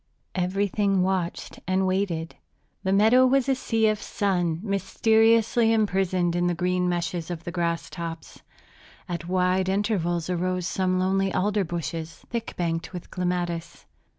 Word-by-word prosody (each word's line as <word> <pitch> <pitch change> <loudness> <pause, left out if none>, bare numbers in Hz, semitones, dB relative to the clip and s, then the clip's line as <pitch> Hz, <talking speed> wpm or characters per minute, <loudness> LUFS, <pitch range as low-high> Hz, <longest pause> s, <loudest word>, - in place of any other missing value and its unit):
Everything 195 +1 +1
watched 185 -2 -2
and 190 +1 +2
waited. 185 -4 -1 0.5
The 190 -1 -1
meadow 220 +6 +5
was 270 0 +2
a 270 - +3
sea 225 -4 +1
of 215 -1 0
sun 175 -6 0
mysteriously 225 +3 +3
imprisoned 190 -5 +1
in 175 0 +1
the 175 - 0
green 180 +1 0
meshes 170 -1 -2
of 170 -2 -5
the 175 - -5
grass 170 -1 -1
tops. 165 -1 -7 0.7
At 170 -2 -4
wide 185 +1 +1
intervals 190 -5 0
arose 180 0 -1
some 185 0 0
lonely 190 +1 +1
alder 205 +2 +1
bushes, 165 -1 -5
thick 235 -1 -4
banked 170 0 -2
with 180 -1 -8
clematis. 175 -2 -3
185 Hz, 140 wpm, -25 LUFS, 175-200 Hz, 0.7 s, meadow